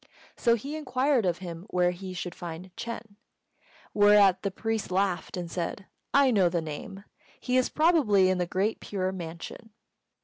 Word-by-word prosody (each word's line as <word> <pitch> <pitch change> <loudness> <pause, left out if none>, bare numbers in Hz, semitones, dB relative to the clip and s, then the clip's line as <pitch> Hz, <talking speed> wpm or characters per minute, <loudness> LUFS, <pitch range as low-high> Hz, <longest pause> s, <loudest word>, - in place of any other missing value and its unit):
So 235 -1 +3
he 280 +7 -5
inquired 260 -5 +1
of 175 -1 0
him 175 0 -8
where 180 0 +2
he 185 +1 -7
should 180 0 -4
find 175 +1 -8
Ch'êng; 230 -3 -7 0.8
whereat 205 -2 +5
the 200 - -1
priest 225 +2 -3
laughed 185 -1 -1
and 175 -2 -5
said, 180 +2 -4 0.3
"I 280 -2 +5
know 195 -6 +4
the 170 0 0
name. 160 +5 -7 0.4
He 250 - -1
is 255 -1 +3
probably 290 - +4
in 185 - 0
the 175 - 0
Great 195 +5 0
Pure 185 -2 -2
Mansion." 170 +4 -8
195 Hz, 165 wpm, -28 LUFS, 180-230 Hz, 0.8 s, whereat